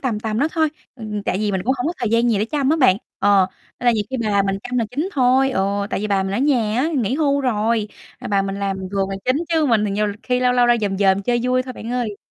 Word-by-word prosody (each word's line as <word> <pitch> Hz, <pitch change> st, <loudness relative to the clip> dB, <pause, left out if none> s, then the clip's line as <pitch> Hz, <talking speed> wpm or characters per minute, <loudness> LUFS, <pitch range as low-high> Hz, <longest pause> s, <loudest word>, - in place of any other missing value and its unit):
tầm 230 Hz, -6 st, -2 dB
tầm 220 Hz, -1 st, -2 dB
đó 290 Hz, +5 st, +2 dB
thôi, 315 Hz, -2 st, +2 dB, 0.3 s
ừm, 220 Hz, -4 st, -8 dB
ừm, 210 Hz, -1 st, -3 dB
tại 190 Hz, -, -1 dB
vì 210 Hz, -1 st, -1 dB
mình 190 Hz, -, 0 dB
cũng 260 Hz, -, +2 dB
hổng 250 Hz, -, -1 dB
có 335 Hz, -, 0 dB
thời 235 Hz, -, -1 dB
gian 230 Hz, +1 st, +3 dB
gì 210 Hz, -, +1 dB
để 210 Hz, -, +1 dB
chăm 280 Hz, +3 st, 0 dB
á 320 Hz, -, +3 dB
bạn, 255 Hz, -, +4 dB, 0.2 s
ờ, 195 Hz, -2 st, +4 dB, 0.3 s
nên 245 Hz, -, -3 dB
là 240 Hz, -, +6 dB
nhiều 215 Hz, -2 st, -1 dB
khi 265 Hz, -, -2 dB
bà 205 Hz, -2 st, +2 dB
mình 195 Hz, 0 st, -1 dB
chăm 250 Hz, 0 st, -2 dB
là 230 Hz, -, +1 dB
chính 295 Hz, +9 st, -2 dB
thôi, 265 Hz, 0 st, +3 dB
ừ, 200 Hz, -2 st, -1 dB
tại -, -, -1 dB
vì 210 Hz, -, -2 dB
bà 195 Hz, -2 st, +1 dB
mình 190 Hz, -, -3 dB
ở 210 Hz, -, 0 dB
nhà 245 Hz, -6 st, +1 dB
á, 310 Hz, -, +1 dB
nghỉ 240 Hz, 0 st, 0 dB
hưu 280 Hz, -2 st, +1 dB
rồi, 225 Hz, -3 st, 0 dB, 0.3 s
à, -, -, -7 dB
bà 200 Hz, -1 st, +2 dB
mình 195 Hz, 0 st, -4 dB
làm 195 Hz, -1 st, -1 dB, 0.2 s
vườn 195 Hz, -1 st, 0 dB
là 195 Hz, -, -3 dB
chính 255 Hz, +1 st, +2 dB
chứ 320 Hz, -2 st, +2 dB
mình 225 Hz, -5 st, +2 dB
thì 205 Hz, -, -1 dB
nhiều 210 Hz, +2 st, 0 dB, 0.2 s
khi 250 Hz, -1 st, 0 dB
lâu 250 Hz, 0 st, +3 dB
lâu 245 Hz, -1 st, +3 dB
ra 240 Hz, 0 st, +4 dB
dòm 195 Hz, -2 st, -1 dB
dòm 195 Hz, -1 st, +3 dB
chơi 240 Hz, +3 st, 0 dB
vui 255 Hz, +1 st, +1 dB
thôi 255 Hz, 0 st, -7 dB
bạn 230 Hz, -1 st, -8 dB
ơi. 240 Hz, -5 st, -2 dB
230 Hz, 305 wpm, -20 LUFS, 200-255 Hz, 0.3 s, là